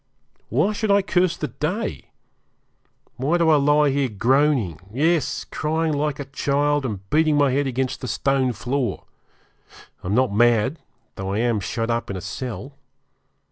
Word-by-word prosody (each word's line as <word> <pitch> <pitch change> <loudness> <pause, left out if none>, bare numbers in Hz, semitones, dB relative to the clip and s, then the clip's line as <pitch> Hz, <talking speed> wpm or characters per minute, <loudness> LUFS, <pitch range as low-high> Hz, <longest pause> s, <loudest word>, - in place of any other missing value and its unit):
Why 210 - +2
should 210 +1 -2
I 200 0 +4
curse 180 -2 +1
the - - -3
day? - - -3 1.1
Why 145 +7 +1
do 170 -2 +3
I 155 - +6
lie 145 0 +3
here, 135 -1 0
groaning; 120 - +1
yes, 160 +6 +1
crying 160 +1 -1
like 145 -1 -1
a 140 - -4
child, 145 +1 0
and 100 -4 -6
beating 155 0 +3
my 145 -2 +3
head 140 +2 +1
against 130 0 -2
the 125 - -4
stone 135 0 +1
floor? 125 +3 -2 1.0
I - - -5
am 100 - 0
not 130 -3 +2
mad, 120 +6 +3 0.4
though 95 0 -3
I - - -1
am 115 -1 +1
shut 115 +4 -2
up 115 0 -2
in 100 - -3
a - - -6
cell. 130 +8 -6
135 Hz, 165 wpm, -22 LUFS, 120-150 Hz, 1.1 s, I